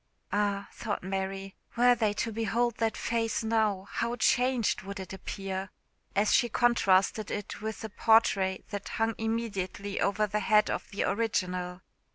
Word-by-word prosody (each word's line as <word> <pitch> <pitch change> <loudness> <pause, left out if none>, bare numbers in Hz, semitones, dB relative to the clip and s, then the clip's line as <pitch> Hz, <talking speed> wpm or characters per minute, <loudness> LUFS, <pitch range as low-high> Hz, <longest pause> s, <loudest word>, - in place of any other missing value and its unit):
"Ah!" 200 -1 0
thought 215 -5 -4
Mary, 195 +1 -3 0.2
"were 245 +1 +6
they 225 -3 +1
to 225 +2 -2
behold 230 +2 0
that 225 -1 0
face 230 -1 -1
now, 215 -4 +1
how 235 +3 -2
changed 245 0 +2
would 195 +1 -7
it 190 -1 -7
appear!" 195 0 -5 0.5
as 205 +1 +3
she 240 -2 +4
contrasted 215 -3 +3
it 205 0 -5
with 220 0 -4
the 220 - -5
portrait 200 -3 +3
that 205 -1 -5
hung 225 0 +1
immediately 210 -3 -2
over 210 +2 +2
the 210 0 -1
head 210 0 +3
of - - -4
the 200 - -2
original. 180 -5 -1
210 Hz, 155 wpm, -29 LUFS, 195-225 Hz, 0.5 s, were